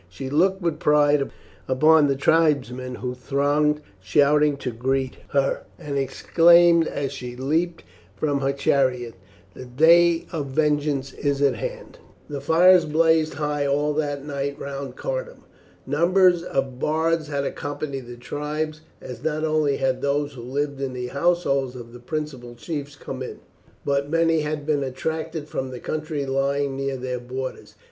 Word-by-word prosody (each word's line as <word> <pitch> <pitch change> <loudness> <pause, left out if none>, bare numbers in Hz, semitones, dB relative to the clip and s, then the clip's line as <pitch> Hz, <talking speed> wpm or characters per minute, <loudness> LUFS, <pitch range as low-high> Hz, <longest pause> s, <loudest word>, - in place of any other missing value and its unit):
She 130 +9 -7
looked 185 +5 +2
with 170 -3 -1
pride 145 -1 +3 0.4
upon 155 +3 +5
the 140 - +1
tribesmen 135 -5 +1
who 125 0 -4
thronged 145 +4 +1 0.2
shouting 145 +9 +3
to 130 -2 -4
greet 130 +3 -1
her, 140 -1 +1 0.2
and 145 -1 -5
exclaimed 170 +5 +4
as 140 -2 -3
she 125 -3 -7
leapt 160 +7 -1 0.3
from 145 +4 0
her 135 0 +1
chariot, 130 -3 +1 0.4
"The 130 - -9
day 165 +6 +4
of 150 -4 -3
vengeance 145 -1 0
is 140 -1 -1
at 140 - +4
hand." - - -7 0.3
The 145 -2 -5
fires 175 +4 +5
blazed 160 0 +2
high 150 -1 -1
all 145 +2 +1
that 145 -2 -2
night 140 -1 -3
round 140 0 -6
Cardun. - - -5 0.4
Numbers 175 +4 +3
of 135 -6 -3
bards 160 +1 0
had 140 -2 -2
accompanied 140 -2 -4
the 120 0 -9
tribes, 150 +4 -4 0.2
as 125 -1 -9
not 155 0 -1
only 155 -3 +1
had 130 -1 0
those 145 +1 0
who 125 - -9
lived 140 +3 -3
in 135 -2 -3
the 125 -1 -4
households 140 -4 0
of 120 -1 -10
the 120 - -10
principal 130 -3 -5
chiefs 145 +2 -6
come 135 -2 -7
in, 130 - -6 0.5
but 140 0 0
many 165 0 +2
had 150 -1 -3
been 150 -2 +1
attracted 160 +4 -4
from 130 -3 -4
the 125 -1 -7
country 155 -1 -3
lying 135 +1 0
near 135 0 -2
their 125 0 -4
borders. 130 +2 -6
145 Hz, 155 wpm, -23 LUFS, 135-155 Hz, 0.5 s, upon